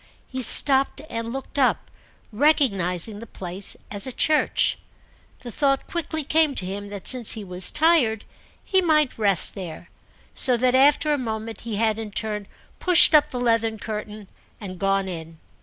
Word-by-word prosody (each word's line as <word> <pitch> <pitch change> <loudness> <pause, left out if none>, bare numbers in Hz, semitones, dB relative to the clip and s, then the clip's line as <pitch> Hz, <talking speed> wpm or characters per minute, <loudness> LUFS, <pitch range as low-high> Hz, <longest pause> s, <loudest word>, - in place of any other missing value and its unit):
He 260 0 -5
stopped 270 +3 +4
and 230 0 -5
looked 270 +2 -6
up, 260 - 0 0.4
recognising 210 - +1
the 230 - -11
place 185 0 -5
as 205 +4 -3
a - - -5
church. 305 +5 +1 0.6
The 240 - -9
thought 275 +1 0
quickly 315 -2 -4
came 305 0 +1
to 185 - -3
him 200 +2 -7
that 200 -2 -9
since 250 -4 +3
he 220 - -7
was 180 -1 0
tired 295 -9 +1 0.4
he 380 -1 +2
might 305 -8 +1
rest 200 -6 +3
there; 175 -3 -9 0.4
so 250 -2 +3
that 250 +1 +1
after 290 +3 +3
a 290 - -2
moment 220 -2 -5
he 230 -2 -5
had 220 +1 0
in 220 -1 -6
turn 210 -1 -4 0.3
pushed 360 -3 +5
up 300 -1 +4
the 250 - -5
leathern 230 -2 0
curtain 210 -1 -7 0.3
and 185 -4 -9
gone 195 0 0
in. 165 -2 -8
225 Hz, 165 wpm, -22 LUFS, 200-275 Hz, 0.6 s, pushed